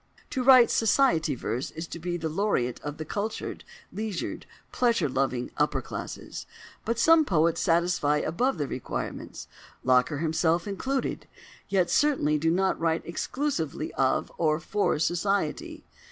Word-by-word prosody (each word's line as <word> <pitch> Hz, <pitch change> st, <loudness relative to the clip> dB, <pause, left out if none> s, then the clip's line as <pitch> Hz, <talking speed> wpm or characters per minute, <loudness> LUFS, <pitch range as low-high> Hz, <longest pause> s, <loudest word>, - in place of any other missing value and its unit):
To 260 Hz, -, -1 dB
write 255 Hz, -2 st, +7 dB
"society 220 Hz, -, +3 dB
verse" 120 Hz, +2 st, -3 dB
is 160 Hz, +2 st, -6 dB
to 170 Hz, -, -7 dB
be 175 Hz, +1 st, -3 dB
the 165 Hz, -1 st, -3 dB
laureate 155 Hz, -, 0 dB
of 145 Hz, 0 st, -6 dB
the 155 Hz, -, -5 dB
cultured, 210 Hz, +7 st, -4 dB, 0.3 s
leisured, 210 Hz, -4 st, -4 dB, 0.2 s
pleasure 235 Hz, -7 st, +2 dB
loving 130 Hz, -2 st, -1 dB
upper -, -, +1 dB
classes; -, -, -7 dB, 0.4 s
but 230 Hz, +1 st, -1 dB
some 320 Hz, +6 st, +6 dB
poets 165 Hz, -, +2 dB
satisfy 165 Hz, -3 st, +2 dB
the -, -, -3 dB
above 245 Hz, +6 st, 0 dB
requirements—Locker 130 Hz, 0 st, -2 dB
himself 160 Hz, +3 st, +1 dB
included—yet 200 Hz, -4 st, -3 dB
certainly 260 Hz, -, +2 dB
do 165 Hz, +2 st, +1 dB
not 190 Hz, +3 st, +1 dB
write 165 Hz, 0 st, 0 dB
exclusively 170 Hz, -, -3 dB
of 130 Hz, -1 st, +1 dB
or 155 Hz, -1 st, +2 dB
for 205 Hz, +1 st, 0 dB
"Society." 175 Hz, +1 st, -1 dB
170 Hz, 130 wpm, -27 LUFS, 150-215 Hz, 0.4 s, write